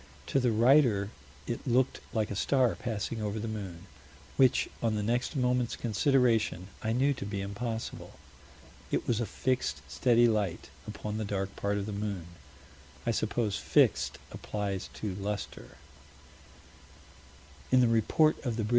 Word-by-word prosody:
To 135 - +5
the 125 -2 +2
writer, 115 -3 +4 0.3
it 120 +3 -4
looked 125 +1 +2
like 110 -2 -1
a - - -2
star 130 +3 +2
passing 115 -1 -3
over 105 0 -2
the 110 +1 -3
moon 100 -5 -6 0.5
"which, 130 -2 +4
on 115 -2 +1
the 105 - -1
next 120 +7 0
moment's 125 -2 +1
consideration 115 - +2
I 110 - -1
knew 135 +5 +3
to 125 - -6
be 100 0 -4
impossible." 110 +4 -4 0.8
"It - - -1
was 120 -1 +1
a 115 - -1
fixed, 125 - -1
steady 120 - +4
light 105 -6 -1 0.2
upon 105 0 -4
the - - -1
dark 100 -1 -3
part 100 0 -1
of 100 - -2
the 105 - -4
moon." 100 -4 -3 0.8
I 115 - +2
suppose 110 -1 0
"fixed" - - +3
applies 100 -3 -3
to 105 -3 -3
luster. 100 -10 -5 1.9
In 130 - +6
the 115 -2 +4
_Report 155 +8 +2
of 120 -4 -2
the 110 - 0
Brit. 105 - -3
110 Hz, 155 wpm, -30 LUFS, 100-120 Hz, 1.9 s, In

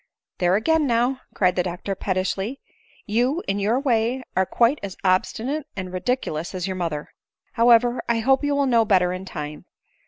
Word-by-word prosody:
" - - -68
There 180 +1 +3
again, 310 +7 +2
now! 245 +2 +1
" - - -37
cried 180 -2 +2
the 180 - +2
doctor 180 +2 -4
pettishly; 190 +6 -2 0.2
" - - -31
you, 245 - 0
in 195 +1 0
your 215 +5 +1
way, 250 -1 0
are 190 0 +2
quite 240 +5 +2
as 195 -2 -6
obstinate 235 +10 0
and 185 -2 -6
ridiculous 185 -5 -2
as 180 -1 -2
your 190 -1 -3
mother. 165 -5 -3 0.4
However, 240 +1 +4
I 235 - +2
hope 265 +5 +2
you 290 0 +1
will 280 0 +2
know 235 -3 +4
better 185 -4 +2
in 185 +1 -6
time. 150 -4 -7
215 Hz, 190 wpm, -23 LUFS, 185-250 Hz, 0.4 s, However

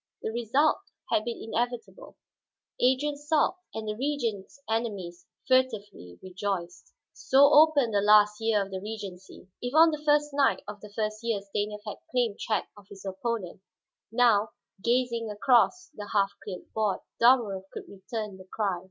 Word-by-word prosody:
The - - -2
result 240 +7 +2 0.3
had 215 - +2
been 235 -1 -4
inevitable; 240 - -4 0.6
Adrian 265 +4 +2
sulked 300 +4 +1 0.2
and 220 -1 -5
the 210 - -1
Regent's 240 -5 -3
enemies 200 -6 -3 0.2
furtively 220 - 0
rejoiced. 185 -2 -5 0.2
So 270 +2 +4
opened 290 -6 +5
the 200 - +3
last 210 +1 +5
year 220 -2 +2
of 195 - -14
the 190 -1 -5
regency. 200 -4 -8
If 245 +3 -4
on 325 +1 +7
the 305 -1 -4
first 295 -1 +2
night 280 -1 +2
of 210 0 -8
the 210 - -11
first 215 0 -3
year 230 -3 0
Stanief 210 +1 -4
had 210 - -6
claimed 240 -5 0
check 215 - -1
of 205 -2 -17
his 200 0 -12
opponent, 195 -1 -4 0.5
now, 225 -3 +3 0.3
gazing 235 -2 0
across 255 - +2
the 205 -7 -8
half 200 -1 +2
cleared 185 -3 -9
board, 215 -3 0 0.2
Dalmorov 220 -6 +3
could - - -8
return 205 0 -6
the 185 - -13
cry. 200 -5 -1
220 Hz, 155 wpm, -28 LUFS, 200-255 Hz, 0.6 s, on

